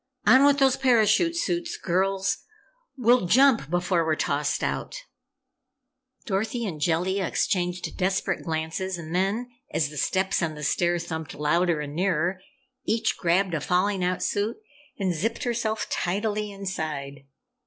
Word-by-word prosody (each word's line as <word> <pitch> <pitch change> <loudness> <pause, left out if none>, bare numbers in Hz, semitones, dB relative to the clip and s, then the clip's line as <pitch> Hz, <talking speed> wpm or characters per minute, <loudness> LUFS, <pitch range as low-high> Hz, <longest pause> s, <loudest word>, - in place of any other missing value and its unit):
"On 260 +2 +7
with 285 0 +5
those 270 -2 +3
parachute 255 - +3
suits, 345 0 -2
girls! 190 +2 0 0.6
We'll 245 -5 +3
jump 255 - +4
before 175 0 +1
we're 160 -1 +1
tossed 145 -1 -1
out!" - - -2 1.3
Dorothy 225 +4 -1
and 160 -7 -5
Jellia 180 +4 +1
exchanged 180 -2 -1
desperate 190 0 0
glances 165 +3 -3
and 165 -1 -7
then 205 +7 0 0.2
as 150 -3 0
the 150 - -9
steps 190 +7 +1
on 160 -2 -1
the 150 - -8
stair 175 +3 +1
thumped 160 -2 -5
louder 165 +2 +1
and 145 -1 -6
nearer 180 +1 0 0.4
each 225 0 0
grabbed 180 +1 +1
a 155 - -1
falling 185 +4 +1
out 180 0 0
suit 210 +3 -1 0.4
and 190 -3 0
zipped 225 +8 -2
herself 225 -2 -1
tidily 210 +3 -1
inside. 155 -8 -5
185 Hz, 140 wpm, -26 LUFS, 165-215 Hz, 1.3 s, On